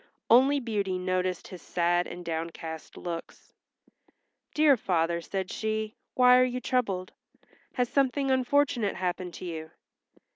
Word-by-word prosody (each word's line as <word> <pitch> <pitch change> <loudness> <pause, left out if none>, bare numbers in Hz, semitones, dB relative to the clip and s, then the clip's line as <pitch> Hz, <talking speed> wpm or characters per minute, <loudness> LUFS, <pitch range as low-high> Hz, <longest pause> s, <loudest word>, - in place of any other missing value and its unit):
Only 270 +4 +6
Beauty 205 -6 -1
noticed 185 -1 -2
his 180 -3 -9
sad 175 0 +1
and 175 0 -8
downcast 160 -1 -5
looks. 170 -1 -7 1.0
"Dear 300 -2 +6
father," 170 -6 0
said 190 +2 -4
she, 220 0 -2 0.2
"why 250 0 +7
are - - +6
you 250 0 -1
troubled? 205 -9 -1 0.6
Has 250 -1 +1
something 275 +1 +1
unfortunate 260 -4 +2
happened 180 -1 -3
to - - -8
you?" 160 -2 -6
190 Hz, 125 wpm, -28 LUFS, 175-250 Hz, 1.0 s, why